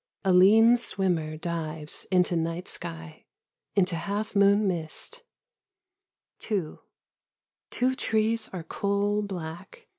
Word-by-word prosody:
A 190 Hz, -, +4 dB
lean 220 Hz, +6 st, +7 dB
swimmer 175 Hz, -9 st, -1 dB
dives 160 Hz, -2 st, -4 dB
into 180 Hz, -1 st, +2 dB
night 165 Hz, +2 st, -2 dB
sky, 80 Hz, -1 st, -7 dB, 0.5 s
Into 185 Hz, -3 st, +2 dB
half 200 Hz, +6 st, -3 dB
moon 200 Hz, +1 st, +4 dB
mist. 175 Hz, -, -4 dB, 1.2 s
2 190 Hz, -8 st, -3 dB, 0.9 s
Two 255 Hz, +1 st, +1 dB
trees 225 Hz, -2 st, 0 dB
are 180 Hz, -3 st, -6 dB
coal 200 Hz, +4 st, 0 dB
black. 185 Hz, -, -7 dB
190 Hz, 100 wpm, -27 LUFS, 165-210 Hz, 1.2 s, lean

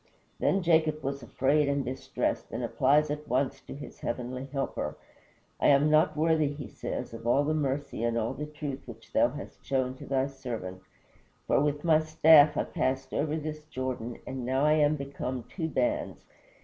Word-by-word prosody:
Then 195 Hz, -1 st, +2 dB
Jacob 160 Hz, -2 st, +2 dB
was 140 Hz, +1 st, -3 dB
afraid 140 Hz, +5 st, +1 dB
and 140 Hz, -1 st, 0 dB
distressed, 130 Hz, +2 st, -2 dB
and -, -, -3 dB
applies 145 Hz, +3 st, +3 dB
at 150 Hz, 0 st, -5 dB
once 130 Hz, +2 st, 0 dB
to -, -, -9 dB
his 145 Hz, -, -10 dB
heavenly 125 Hz, +2 st, -4 dB
Helper. 135 Hz, 0 st, -3 dB, 0.6 s
"I -, -, +3 dB
am 145 Hz, +2 st, +5 dB
not 155 Hz, 0 st, +4 dB
worthy," 160 Hz, -1 st, +3 dB
he 145 Hz, -3 st, -5 dB
says, 105 Hz, -, -5 dB
"of 115 Hz, 0 st, -7 dB
all 135 Hz, +4 st, +4 dB
the 155 Hz, +2 st, 0 dB
mercy 140 Hz, -5 st, -2 dB
and 115 Hz, 0 st, +1 dB
all 115 Hz, -1 st, -1 dB
the 150 Hz, -, -5 dB
truth 150 Hz, -3 st, -6 dB
which -, -, -12 dB
thou -, -, +4 dB
hast -, -, -9 dB
shown 130 Hz, -1 st, 0 dB
to -, -, -10 dB
thy 135 Hz, -1 st, +1 dB
servant, 120 Hz, -9 st, -6 dB, 0.6 s
for -, -, +3 dB
with 145 Hz, 0 st, 0 dB
my 160 Hz, -2 st, +5 dB
staff 155 Hz, -1 st, +6 dB
I -, -, +2 dB
passed 130 Hz, +1 st, -2 dB
over 150 Hz, +1 st, 0 dB
this 155 Hz, -1 st, -4 dB
Jordan 130 Hz, -4 st, -4 dB
and 130 Hz, -1 st, -5 dB
now 130 Hz, +3 st, +1 dB
I 150 Hz, -, +4 dB
am 150 Hz, -1 st, +3 dB
become 135 Hz, -3 st, -4 dB
two 165 Hz, +4 st, -4 dB
bands. 305 Hz, -, -1 dB
140 Hz, 185 wpm, -29 LUFS, 130-155 Hz, 0.6 s, staff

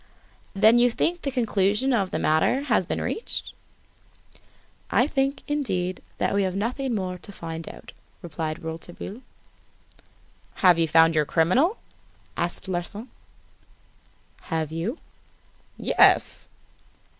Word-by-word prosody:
"Then 220 Hz, +4 st, +6 dB
you 245 Hz, 0 st, +5 dB
think 340 Hz, +8 st, -1 dB
the 280 Hz, -, -2 dB
conclusion 225 Hz, 0 st, +1 dB
of 200 Hz, -5 st, +1 dB
the -, -, -2 dB
matter 160 Hz, -, +2 dB
has 215 Hz, -, +1 dB
been -, -, -2 dB
reached?" 450 Hz, -, -4 dB, 1.4 s
"I 245 Hz, -, +3 dB
think, 275 Hz, -1 st, -1 dB
indeed, 190 Hz, -12 st, -2 dB, 0.2 s
that -, -, 0 dB
we 200 Hz, -, +2 dB
have 190 Hz, -1 st, -1 dB
nothing 245 Hz, +4 st, -1 dB
more 185 Hz, -3 st, -3 dB
to 200 Hz, -, -11 dB
find 165 Hz, -3 st, -6 dB
out," -, -, -12 dB, 0.3 s
replied 160 Hz, -1 st, -4 dB
Rouletabille. 170 Hz, +7 st, -7 dB, 1.4 s
"Have 175 Hz, -2 st, +7 dB
you 165 Hz, -, +3 dB
found 165 Hz, +1 st, +5 dB
your 155 Hz, -1 st, +2 dB
criminal?" 245 Hz, -, +2 dB, 0.6 s
asked 175 Hz, +2 st, -2 dB
Larsan. 190 Hz, +6 st, -4 dB, 1.4 s
"Have 160 Hz, -3 st, -2 dB
you?" 175 Hz, -, -3 dB, 0.8 s
"Yes." -, -, +3 dB
190 Hz, 120 wpm, -25 LUFS, 165-245 Hz, 1.4 s, Have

